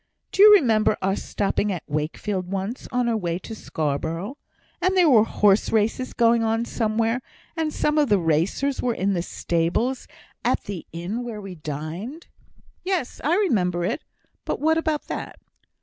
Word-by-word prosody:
"Do -, -, +1 dB
you 420 Hz, +1 st, +10 dB
remember 220 Hz, -, +3 dB
our 190 Hz, +1 st, +2 dB
stopping 205 Hz, 0 st, -1 dB
at 180 Hz, -4 st, -4 dB
Wakefield 170 Hz, +6 st, -3 dB
once, 195 Hz, +5 st, -4 dB
on 250 Hz, -1 st, +1 dB
our 230 Hz, -, +1 dB
way 175 Hz, -5 st, -1 dB
to 205 Hz, +5 st, -8 dB
Scarborough, 160 Hz, -, -3 dB, 0.5 s
and 375 Hz, +1 st, +2 dB
there 360 Hz, -2 st, +6 dB
were 235 Hz, -7 st, +6 dB
horse 205 Hz, -2 st, +3 dB
races 225 Hz, +4 st, +1 dB
going 235 Hz, -1 st, +4 dB
on 225 Hz, +1 st, +1 dB
somewhere, 225 Hz, +1 st, 0 dB, 0.3 s
and 320 Hz, -2 st, -1 dB
some 300 Hz, 0 st, +1 dB
of 290 Hz, -4 st, +2 dB
the 205 Hz, -, +5 dB
racers 175 Hz, -, 0 dB
were 240 Hz, -2 st, 0 dB
in 195 Hz, +1 st, 0 dB
the 175 Hz, -, 0 dB
stables 175 Hz, +10 st, -1 dB, 0.4 s
at -, -, +1 dB
the 190 Hz, -5 st, -6 dB
inn 180 Hz, +9 st, -4 dB
where 230 Hz, -3 st, -6 dB
we 195 Hz, -2 st, -7 dB
dined?" 160 Hz, -, -6 dB, 0.6 s
"Yes! 365 Hz, -9 st, -2 dB
I 315 Hz, +5 st, +3 dB
remember 180 Hz, -, +1 dB
it; 230 Hz, -, -2 dB, 0.4 s
but -, -, -3 dB
what 320 Hz, +2 st, +3 dB
about 315 Hz, -2 st, -1 dB
that?" -, -, -5 dB
215 Hz, 165 wpm, -24 LUFS, 180-255 Hz, 0.6 s, you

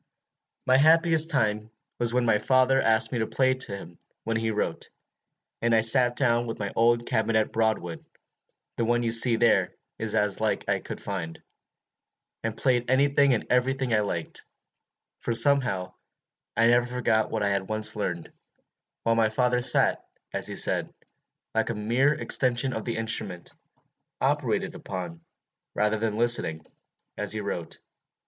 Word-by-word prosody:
"My 130 Hz, 0 st, +4 dB
happiest 160 Hz, +2 st, +4 dB
time 110 Hz, -7 st, -1 dB, 0.3 s
was 120 Hz, -1 st, +2 dB
when 125 Hz, 0 st, 0 dB
my 110 Hz, -2 st, +2 dB
father 130 Hz, +2 st, +2 dB
asked 110 Hz, 0 st, +1 dB
me 120 Hz, -, -2 dB
to 110 Hz, -, -1 dB
play 130 Hz, -1 st, +1 dB
to 125 Hz, -6 st, -3 dB
him 85 Hz, -3 st, -13 dB, 0.2 s
while 115 Hz, +1 st, -3 dB
he 110 Hz, 0 st, -1 dB
wrote, 105 Hz, -1 st, -3 dB, 0.7 s
and 115 Hz, 0 st, +2 dB
I 110 Hz, -, +4 dB
sat 120 Hz, +2 st, +3 dB
down 120 Hz, -2 st, +1 dB
to 115 Hz, -, -4 dB
my 100 Hz, -2 st, -5 dB
old 120 Hz, +1 st, +2 dB
cabinet 110 Hz, 0 st, 0 dB
Broadwood, 110 Hz, -7 st, -2 dB, 0.7 s
the 115 Hz, -, 0 dB
one 120 Hz, +1 st, 0 dB
you 115 Hz, -, -1 dB
see 115 Hz, +1 st, +5 dB
there 115 Hz, 0 st, +2 dB, 0.2 s
is 110 Hz, -1 st, -2 dB
as 105 Hz, 0 st, 0 dB
like 110 Hz, -, -1 dB
it -, -, -10 dB
as -, -, +3 dB
I -, -, -9 dB
could -, -, -8 dB
find, 85 Hz, -5 st, -6 dB, 1.0 s
and 110 Hz, -1 st, -4 dB
played 125 Hz, -2 st, 0 dB
any 135 Hz, +2 st, +3 dB
thing 140 Hz, -2 st, +3 dB
and 110 Hz, -, -4 dB
every 125 Hz, +2 st, +2 dB
thing 130 Hz, -3 st, -3 dB
I 105 Hz, -, +3 dB
liked, 95 Hz, -6 st, -4 dB, 0.8 s
for 120 Hz, -, -3 dB
somehow 115 Hz, -7 st, +3 dB, 0.6 s
I 115 Hz, -, +4 dB
never 120 Hz, +1 st, +3 dB
forgot 120 Hz, -3 st, 0 dB
what 110 Hz, -2 st, -2 dB
I 100 Hz, -, +1 dB
had 100 Hz, 0 st, -2 dB
once 110 Hz, 0 st, +1 dB
learned, 90 Hz, -5 st, -4 dB, 0.7 s
while 115 Hz, -, +2 dB
my 115 Hz, -1 st, +2 dB
father 125 Hz, +2 st, 0 dB
sat, -, -, +3 dB, 0.3 s
as -, -, +1 dB
he -, -, -6 dB
said, -, -, +1 dB, 0.6 s
like 110 Hz, 0 st, 0 dB
a 115 Hz, -, -3 dB
mere 120 Hz, +7 st, +1 dB
extension 130 Hz, -3 st, +1 dB
of 110 Hz, -, -5 dB
the 115 Hz, -, -3 dB
instrument, 110 Hz, -5 st, -2 dB, 0.7 s
operated -, -, -1 dB
upon, 90 Hz, -3 st, -7 dB, 0.5 s
rather 105 Hz, +1 st, +1 dB
than 110 Hz, -1 st, -2 dB
listening, 115 Hz, -10 st, +2 dB, 0.5 s
as 105 Hz, 0 st, 0 dB
he 110 Hz, -, -3 dB
wrote. 95 Hz, -5 st, -5 dB
115 Hz, 170 wpm, -26 LUFS, 105-125 Hz, 1.0 s, see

